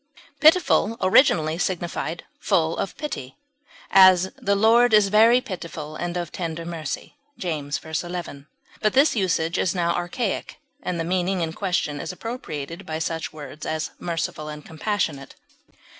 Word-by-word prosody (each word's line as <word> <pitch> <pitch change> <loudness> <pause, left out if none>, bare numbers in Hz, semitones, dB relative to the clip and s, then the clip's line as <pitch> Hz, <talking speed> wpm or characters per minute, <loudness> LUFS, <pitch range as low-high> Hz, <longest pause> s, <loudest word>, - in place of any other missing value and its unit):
Pitiful 300 - +4
originally 170 - +4
signified 175 -2 -2 0.2
full 160 -1 +1
of 195 - -4
pity; 205 - -6 0.5
as, 185 -1 +7
"the 200 0 0
Lord 225 +2 +5
is 205 -2 +5
very 225 +4 +6
pitiful 165 -7 -7
and 175 +2 -3
of 175 -3 -4
tender 165 -2 -4
mercy," 165 - -5 0.2
James 150 -5 -3
v, 160 - -12 0.2
11; 170 -5 -6 0.3
but 215 -1 +2
this 275 +2 +4
usage 175 -4 0
is 180 - +1
now 170 -1 +1
archaic, 195 +5 -3 0.2
and 180 -2 -3
the - - 0
meaning 180 +1 0
in 160 -1 -2
question 175 -7 -1
is - - -4
appropriated 180 - -6
by 160 -3 -4
such 160 0 -3
words 155 0 -10
as 155 0 -3
merciful 165 -2 -3
and 150 0 -8
compassionate. 160 -5 -3
175 Hz, 145 wpm, -24 LUFS, 160-200 Hz, 0.5 s, as